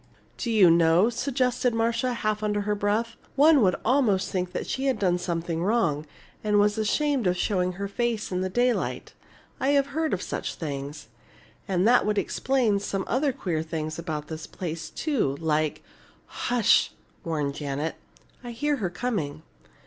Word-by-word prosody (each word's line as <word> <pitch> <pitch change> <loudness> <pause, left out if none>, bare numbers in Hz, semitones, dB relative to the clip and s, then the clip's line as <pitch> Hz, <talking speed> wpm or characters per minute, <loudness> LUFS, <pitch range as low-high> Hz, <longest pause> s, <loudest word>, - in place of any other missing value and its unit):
"Do 240 - -4
you 205 -7 +6
know," 170 +6 +4
suggested 250 -1 0
Marcia, 230 +2 +1
half 215 -2 -1
under 210 -1 0
her 210 +1 0
breath, 210 +3 -1 0.2
"one 295 0 +6
would 185 -4 +4
almost 225 -6 +2
think 180 -1 -1
she 270 - -3
had 260 -4 +1
done 180 -3 +1
something 170 -1 -2
wrong 170 -8 +1 0.4
and 210 -1 +2
was 205 +1 +2
ashamed 270 +2 +1
of 180 0 +1
showing 180 -1 0
her 200 +2 -4
face 225 +1 -2
in 180 0 -1
the 185 - -1
daylight. 245 +5 0 0.5
I've 280 +1 +3
heard 315 +1 0
of - - -6
such - - -4
things. 140 -2 -6 0.6
And 190 0 +2
that 245 +1 +5
would 210 0 0
explain 240 -3 +1
some 195 -1 -2
other 275 +3 +1
queer 175 -10 -2
things 160 0 -4
about 155 -3 -4
this 160 0 -7
place, 165 -3 -5
too, 235 - -1
like 155 -2 0 0.3
" - - -33 0.2
"Hush!" 235 -3 +4 0.3
warned 150 -4 -1
Janet. 145 +2 -3 0.5
"I 240 -1 -6
hear 290 +5 0
her 195 -7 -2
coming." 180 -7 -3
205 Hz, 165 wpm, -26 LUFS, 165-240 Hz, 0.6 s, you